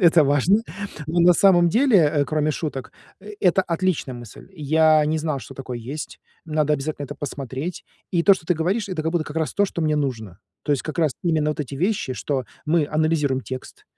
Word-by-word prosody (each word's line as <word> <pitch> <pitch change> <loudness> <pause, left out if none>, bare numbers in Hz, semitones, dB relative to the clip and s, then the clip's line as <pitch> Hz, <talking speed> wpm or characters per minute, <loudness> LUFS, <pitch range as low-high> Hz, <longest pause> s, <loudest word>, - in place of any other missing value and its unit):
Это 165 -4 +6
важно. 150 - +3 0.4
Ну, 170 +2 +1
на 175 +1 +7
самом 175 -1 +5
деле, 245 +4 +4
э, 145 -2 +3
кроме 155 0 0
шуток, 145 -4 -5 0.3
это 195 -2 +1
отличная 170 -6 -1
мысль. 120 - -11
Я 155 -1 +3
не 160 +1 0
знал, 155 -2 -2
что 110 - -11
такое 125 -3 -6
есть. 135 +7 -7 0.2
Надо 155 -1 +1
обязательно 145 +1 -4
это 145 - -7
посмотреть. 140 +3 -5 0.3
И 170 -3 +1
то, 200 +1 +7
что 160 - -11
ты 180 - +2
говоришь,- 190 +7 -1
это 180 -5 -3
как 160 +2 -1
будто 165 -3 0
как 150 - -9
раз 160 -1 -1
то, 205 - +3
что 180 -3 -4
мне 155 -1 +1
нужно. 115 -10 -3 0.2
То 145 - 0
есть 140 - 0
как 155 +2 -6
раз 155 -5 +2
именно 155 -3 +1
вот 150 - -4
эти 140 -1 -5
вещи, 180 -4 -1
что 130 +3 -2 0.2
мы 155 -2 +2
анализируем 150 -4 +1
текст, 130 0 -8
155 Hz, 205 wpm, -23 LUFS, 140-175 Hz, 0.4 s, на